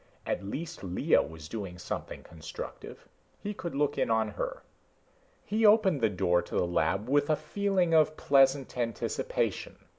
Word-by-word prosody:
At - - -2
least 160 - -6
Lea 90 -1 +2
was 80 -1 -5
doing 95 -2 -6
something 90 - -6
constructive; 80 -1 -9 0.3
he 205 - -4
could 170 -6 -6
look 145 0 0
in - - +1
on 110 -1 +2
her. 105 - -5 0.8
He 215 +3 0
opened 205 - +5
the 110 - +4
door 90 -2 +2
to - - -8
the - - +2
lab 85 +5 0
with 145 +2 +2
a 155 - +4
feeling 185 +2 0
of 155 -1 +4
pleasant 135 -1 +3
anticipation. 475 - -2
135 Hz, 155 wpm, -29 LUFS, -, 0.8 s, opened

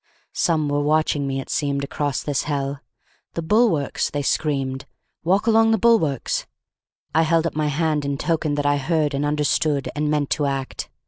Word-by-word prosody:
Some 155 -3 +1
were 145 0 0
watching 150 -1 +1
me, 135 0 -2
it 135 - -7
seemed, 140 -1 -1
across 140 0 -2
this 145 -2 -1
hell. 140 -1 -2 0.6
"The 165 - -2
bulwarks!" 180 - +2
they 145 -1 -3
screamed. 135 -3 -1 0.4
"Walk 190 +6 +2
along 225 0 +4
the 225 - +3
bulwarks!" 190 - +1 0.7
I 160 - +4
held 165 0 +2
up 165 - -1
my 155 -1 0
hand 150 0 0
in 140 0 -2
token 155 -1 0
that 145 0 -1
I 145 0 +3
heard 150 +1 0
and 140 +1 -1
understood 150 0 0
and 150 0 0
meant 150 -2 0
to 145 -2 +1
act. 135 -1 -4
150 Hz, 180 wpm, -22 LUFS, 140-160 Hz, 0.7 s, along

